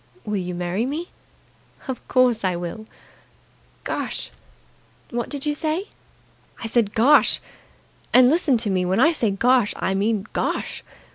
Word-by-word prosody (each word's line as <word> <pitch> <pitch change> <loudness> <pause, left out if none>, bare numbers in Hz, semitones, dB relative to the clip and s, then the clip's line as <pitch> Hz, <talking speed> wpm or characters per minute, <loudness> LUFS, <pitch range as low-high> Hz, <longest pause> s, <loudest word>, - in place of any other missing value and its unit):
"Will 210 -1 -2
you 180 -1 -4
marry 180 +7 -2
me?" 315 +6 -4 0.8
"Of 260 -2 -6
course 250 -4 +3
I 185 -2 +1
will." 175 +6 -6 1.0
"Gosh!" - - -4 0.8
"What 240 -1 -3
did 285 -1 -3
you 295 - +1
say?" 315 +6 -2 0.7
"I - - -6
said 225 -2 +1
Gosh! 275 +7 +5 0.7
And 250 0 +7
listen 295 -3 +3
to 220 -3 -1
me, 185 -1 +1
when 185 +4 0
I 320 +6 +6
say 240 -9 +1
Gosh, 235 +2 +2
I 190 - -1
mean 205 +1 0
Gosh! - - -2
230 Hz, 145 wpm, -23 LUFS, 195-270 Hz, 1.0 s, And